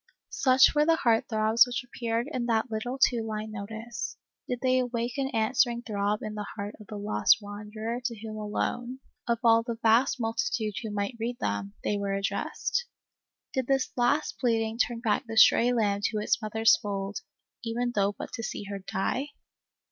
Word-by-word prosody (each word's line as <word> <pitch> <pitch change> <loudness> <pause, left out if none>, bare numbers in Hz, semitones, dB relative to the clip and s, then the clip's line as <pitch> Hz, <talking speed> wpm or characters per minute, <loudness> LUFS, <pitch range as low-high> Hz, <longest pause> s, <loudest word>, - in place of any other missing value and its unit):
Such 260 0 +5
were 295 - +4
the 325 +1 +4
heart 230 -7 +2
throbs 220 +2 +4
which 245 0 -3
appeared 235 0 -2
in 245 -5 -2
that 225 +1 +1
little 245 +4 -3
two 245 -3 +3
line 215 -1 -4
notice. 220 +3 -6 0.3
Did 245 -1 -3
they 255 -1 +3
awake 240 -1 -2
an 270 -1 0
answering 235 0 +1
throb 210 -1 -1
in 215 - -4
the 210 -1 -5
heart 205 0 -5
of 210 - -13
the 215 - -6
lost 105 - +3
wanderer 210 +3 -5
to 235 -4 -2
whom 215 0 -7
alone, 240 +4 -3 0.3
of 235 -1 +2
all 230 -1 +6
the 230 0 -5
vast 235 +4 +4
multitude 225 - -1
who 225 - -5
might 205 +3 -3
read 240 +2 -2
them, 100 0 -3
they 205 - 0
were 200 -1 -1
addressed? 340 - -2 0.7
Did 260 -2 -1
this 270 -1 +1
last 255 +5 +1
pleading 225 -2 0
turn 240 -1 0
back 220 -4 0
the 225 0 -5
stray 235 +2 +7
lamb 205 -4 +1
to 220 - 0
its 210 +2 +1
mother's 220 0 +4
fold, 200 -1 -4 0.4
even 240 +1 -1
though 200 -1 +1
but - - -7
to - - -4
see 220 - -4
her 200 - -4
die 195 +8 -2
225 Hz, 185 wpm, -28 LUFS, 210-245 Hz, 0.7 s, stray